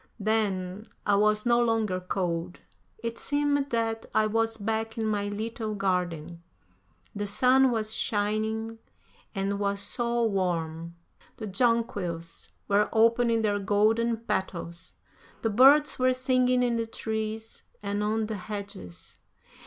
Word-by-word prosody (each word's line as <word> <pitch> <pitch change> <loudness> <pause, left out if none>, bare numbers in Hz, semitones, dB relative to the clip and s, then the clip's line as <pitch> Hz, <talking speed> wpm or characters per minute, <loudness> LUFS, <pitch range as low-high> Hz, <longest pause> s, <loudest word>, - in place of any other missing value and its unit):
Then, 205 -2 -1 0.2
I 205 - +3
was 210 +2 +3
no 240 0 +4
longer 220 -5 +1
cold; 180 -1 -3 0.4
it 230 0 -3
seemed 285 -1 +1
that 225 -1 -1
I 215 - +4
was 225 +1 0
back 225 +1 -2
in 225 - -1
my 205 -1 0
little 215 +1 -4
garden. 175 -4 -2 0.7
The 205 0 -3
sun 255 +6 +4
was 220 -2 -1
shining 220 +1 -1 0.6
and 200 +1 -1
was 200 0 0
so 235 +3 0
warm. 170 -5 -1 0.4
The 220 - -5
jonquils 195 -6 -1 0.2
were 205 +1 +3
opening 230 0 +3
their 205 -1 +1
golden 220 +4 +2
petals; 185 -5 -4 0.5
the 225 - +1
birds 275 +7 +6
were 255 0 +4
singing 255 -1 +2
in 240 -1 +1
the 230 0 -2
trees 220 0 -4 0.2
and 205 +1 -1
on 215 +1 0
the 215 -1 -4
hedges. 195 - -8
215 Hz, 130 wpm, -28 LUFS, 200-230 Hz, 0.7 s, birds